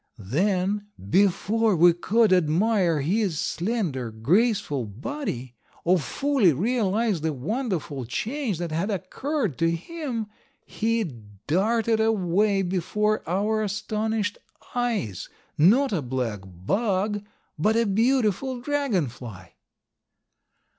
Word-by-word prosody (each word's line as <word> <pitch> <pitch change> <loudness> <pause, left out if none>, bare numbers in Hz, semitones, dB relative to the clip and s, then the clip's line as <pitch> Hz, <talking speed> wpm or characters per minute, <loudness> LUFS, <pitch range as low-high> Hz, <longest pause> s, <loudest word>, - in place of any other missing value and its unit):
Then, 185 - 0 0.2
before 205 +2 +3
we 175 +1 +6
could 215 +4 +3
admire 180 0 +2
his 180 +1 0
slender, 170 - -2
graceful 150 - +1
body, 125 - -5 0.3
or 180 +1 +3
fully 235 - +2
realize 215 - 0
the 160 0 0
wonderful 160 - -3
change 225 - -2
that 170 -1 -4
had 170 +7 -1
occurred 220 - -2
in 165 0 +3
him, 255 - -4 0.4
he 230 +1 0 0.4
darted 220 +7 +2
away 200 -2 +2
before 195 +4 0
our 210 +4 +1
astonished 215 +1 -2 0.3
eyes, 230 - -2 0.3
not 220 - +4
a 175 - 0
black 125 -5 -2
bug, 195 - -1 0.4
but 215 +8 +2
a 230 0 +3
beautiful 240 +3 +1
Dragon 250 - 0
fly. 110 -7 -10
200 Hz, 105 wpm, -25 LUFS, 160-225 Hz, 0.4 s, we